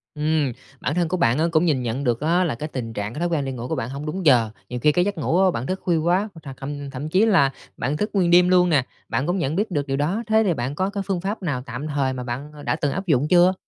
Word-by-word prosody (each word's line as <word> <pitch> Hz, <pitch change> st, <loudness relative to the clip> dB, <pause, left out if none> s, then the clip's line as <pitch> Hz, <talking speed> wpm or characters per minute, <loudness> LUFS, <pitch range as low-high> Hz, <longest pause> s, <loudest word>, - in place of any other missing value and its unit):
Ừm, 150 Hz, -2 st, +1 dB, 0.3 s
bản 150 Hz, -, -1 dB
thân 175 Hz, -1 st, +1 dB
của 185 Hz, +3 st, -1 dB
bạn 125 Hz, -7 st, +3 dB
á 160 Hz, -, +3 dB
cũng 165 Hz, +1 st, +3 dB
nhìn 145 Hz, -6 st, +2 dB
nhận 120 Hz, +4 st, -2 dB
được 120 Hz, -3 st, +1 dB
á 170 Hz, +4 st, +2 dB
là 155 Hz, -8 st, -1 dB
cái 150 Hz, +6 st, -5 dB
tình 120 Hz, -5 st, -5 dB
trạng, 105 Hz, +1 st, -4 dB
cái 150 Hz, -, -6 dB
thói 175 Hz, -, +1 dB
quen 155 Hz, -5 st, 0 dB
đi 135 Hz, -, -3 dB
ngủ 125 Hz, -1 st, -5 dB
của -, -, -2 dB
bạn 115 Hz, -, -3 dB
hông 140 Hz, +3 st, -6 dB
đúng 175 Hz, +4 st, -4 dB
giờ. 120 Hz, -6 st, +5 dB, 0.2 s
Nhiều 125 Hz, -, -4 dB
khi 150 Hz, +5 st, +4 dB
cái 175 Hz, +4 st, +2 dB
giấc 200 Hz, -2 st, -2 dB
ngủ 165 Hz, +3 st, +1 dB
á 190 Hz, -, +4 dB
bạn 120 Hz, -5 st, -3 dB
thức 190 Hz, +1 st, -2 dB
khuya 175 Hz, -2 st, +2 dB
quá, 170 Hz, +3 st, +2 dB
hoặc 165 Hz, -, -13 dB
là 135 Hz, -, -6 dB
thậm 145 Hz, +1 st, -6 dB
thậm 140 Hz, +3 st, -5 dB
chí 190 Hz, +7 st, +4 dB
là 170 Hz, -11 st, +4 dB, 0.3 s
bạn 145 Hz, +3 st, -1 dB
thức 210 Hz, +5 st, -1 dB
nguyên 180 Hz, -4 st, +2 dB
đêm 180 Hz, +1 st, +6 dB
luôn 180 Hz, -1 st, +4 dB
nè, 140 Hz, -6 st, +3 dB, 0.2 s
bạn 135 Hz, -, -1 dB
cũng 175 Hz, +2 st, +1 dB
nhận 160 Hz, -4 st, -1 dB
biết 205 Hz, +2 st, -1 dB
được 145 Hz, -4 st, -1 dB
điều 135 Hz, 0 st, -1 dB
đó. 175 Hz, +11 st, 0 dB
Thế 220 Hz, 0 st, +4 dB
thì 190 Hz, -5 st, +2 dB
bạn 130 Hz, 0 st, -3 dB
có 190 Hz, +5 st, 0 dB
cái 200 Hz, -1 st, -3 dB
phương 190 Hz, -3 st, -1 dB
pháp 200 Hz, +4 st, -3 dB
nào 145 Hz, -7 st, -1 dB
tạm 125 Hz, +5 st, -5 dB
thời 140 Hz, -3 st, 0 dB
mà 125 Hz, -1 st, -5 dB
bạn 130 Hz, +5 st, -5 dB
đã -, -, +1 dB
từng 145 Hz, -, -1 dB
áp 195 Hz, +5 st, -3 dB
dụng 145 Hz, -3 st, +2 dB
chưa? 180 Hz, +2 st, +5 dB
150 Hz, 310 wpm, -23 LUFS, 135-180 Hz, 0.3 s, đêm